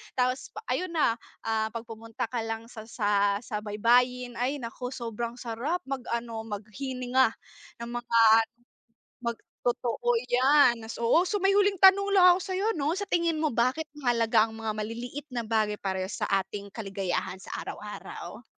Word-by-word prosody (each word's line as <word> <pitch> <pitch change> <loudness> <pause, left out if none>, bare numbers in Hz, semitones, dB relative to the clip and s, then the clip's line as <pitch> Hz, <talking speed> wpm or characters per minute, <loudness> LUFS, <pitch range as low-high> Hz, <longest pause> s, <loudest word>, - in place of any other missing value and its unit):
tapos 255 +1 0
pa 430 - -4 0.2
ayun 365 -1 -3
na, 300 -8 +2 0.3
ah, 220 -1 0
pag 230 0 -5
pumunta 225 0 -5
ka 240 - -1
lang 225 0 -4
sa 225 -2 -9
sa 205 -2 +1
sa 210 -3 -3
baybayin 245 +3 +2
ay 270 +4 0
naku 245 +1 -6
sobrang 235 -1 -4
sarap 250 +9 -2
mag 270 -2 -3
ano, 230 -1 -4
maghininga 250 +4 0 0.5
ng 235 - -5
mga 240 -1 0 1.1
mag 235 -1 -1 0.3
totoo 250 - 0 0.2
yan, 255 -1 +5
nas 225 0 -7
oo, 285 +11 +3
so 410 -1 -1
may 390 - +5
huling 400 0 +4
tanong 385 +2 +6
lang 370 - +7
ako 355 - +2
sayo, 385 +4 -1
'no, 305 -1 -1
sa 405 - -2
tingin 340 -4 +1
mo 310 -1 0
bakit 255 +7 +1 0.2
mahalaga 230 -4 +3
ang 220 - -10
mga 225 -1 -3
maliliit 235 +7 -5
na 245 -3 -3
bagay 215 -1 +1
parehas 190 -1 -3
sa - - +1
ating 200 +1 -7
kaligayahan 195 -4 -3
sa 190 - -11
araw-araw? - - -8
235 Hz, 165 wpm, -28 LUFS, 220-285 Hz, 1.1 s, lang